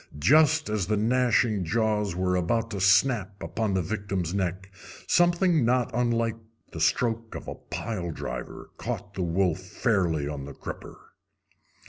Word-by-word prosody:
Just 155 - +4
as 105 -4 -1
the 105 0 +1
gnashing 115 -2 +2
jaws 105 +1 0
were 90 0 0
about 115 +6 0
to 100 -3 -4
snap 100 +1 +3
upon 110 -3 -1
the 95 - +1
victim's 95 -2 -3
neck 95 0 -2 0.3
something 175 -3 +3
not 125 +1 +2
unlike 115 -1 0 0.3
the 80 - -7
stroke 115 +7 0
of - - -7
a - - -4
pile 90 -7 -5
driver - - -6
caught - - -5
the 95 - -4
wolf 90 0 +1
fairly 95 - 0
on 70 -2 -5
the 70 - -8
crupper. - - -9
105 Hz, 145 wpm, -27 LUFS, 90-115 Hz, 0.3 s, Just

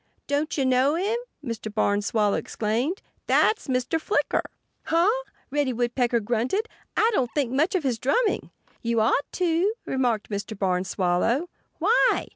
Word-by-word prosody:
"Don't 290 +3 -1
you 270 - +2
know 260 +3 +3
him?" 400 +6 0 0.3
Mr. 225 -3 -4
Barn 205 -1 +1
Swallow 210 -1 +1
exclaimed. 235 - -1 0.2
"That's 435 - +3
Mr. 255 +5 0
Flicker." 410 - +1 0.4
"Huh!" 335 +3 +3 0.4
Reddy 285 -3 +1
Woodpecker 240 0 +1
grunted. 245 - 0 0.3
"I 450 +2 +4
don't 255 - +1
think 275 -5 +1
much 315 +10 +1
of 360 - +1
his 250 -5 0
drumming." 430 - +1 0.3
"You 235 -1 0
ought 225 +6 +1
to," 360 +3 +1
remarked 245 -5 0
Mr. 205 +1 -4
Barn 185 -2 0
Swallow. 195 - +1 0.3
"Why?" 425 +9 +3
255 Hz, 145 wpm, -25 LUFS, 220-325 Hz, 0.4 s, I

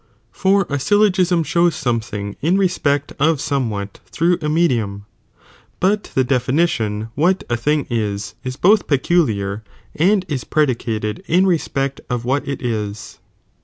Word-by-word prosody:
for 195 +1 +2
a 145 -5 -3
syllogiem 205 +8 +3
jresi 180 0 +2
i)ie 175 - +4
iet - - -3
shows 170 +1 +2
Something 110 -6 -3
in 170 +6 +2
respect 145 -7 0
of 155 +1 +3
somewhat 110 -9 -2
through 170 +1 +1
"""'"■ - - -23
a 150 - 0
medium, 115 -11 0 0.7
but 205 +3 +1
the 130 - +4
(definition) 125 -5 0
what 175 +8 +1
a - - +3
thing 145 +5 0
is, 105 -4 -2
ia 130 -1 -3
both 205 +3 +4
peculiar 110 - +1 0.3
and 190 +4 +2
is 140 -6 -3
predicated 115 -7 -1
in 180 +4 +3
respect 140 -6 -1
of 120 -1 -2
what 135 +3 0
it 140 -2 -4
is. 105 -3 -4
140 Hz, 155 wpm, -19 LUFS, 110-170 Hz, 0.7 s, i)ie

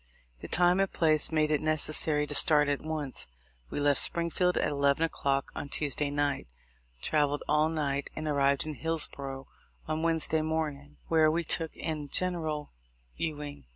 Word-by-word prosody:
The - - -9
time 180 +1 +3
and 195 -1 0
place 155 -2 +2
made 155 -1 +1
it 150 - +1
neces 155 0 +2
sary 150 -1 +5
to 145 - -3
start 150 0 +5
at 145 -1 -1
once. 155 -4 -4 0.4
We - - -4
left 145 -1 +4
Springfield 175 +1 +2
at - - +1
eleven 140 +1 +1
o'clock 140 -4 -1
on 145 - -6
Tuesday 145 0 0
night, 145 - -2 0.6
travelled 145 -1 0
all 150 +1 +2
night, 145 -3 -2
and 155 0 -5
arrived 140 -1 +2
in 155 - -5
Hillsborough 140 -4 -3 0.4
on 155 0 -2
Wednesday 160 -1 0
morning, 150 -2 -4
where 160 -1 +3
we 170 +2 -1
took 165 0 -2
in 155 -3 -5
General 160 -5 -2 0.4
Ewing. 150 - -5
150 Hz, 160 wpm, -29 LUFS, 145-160 Hz, 0.6 s, sary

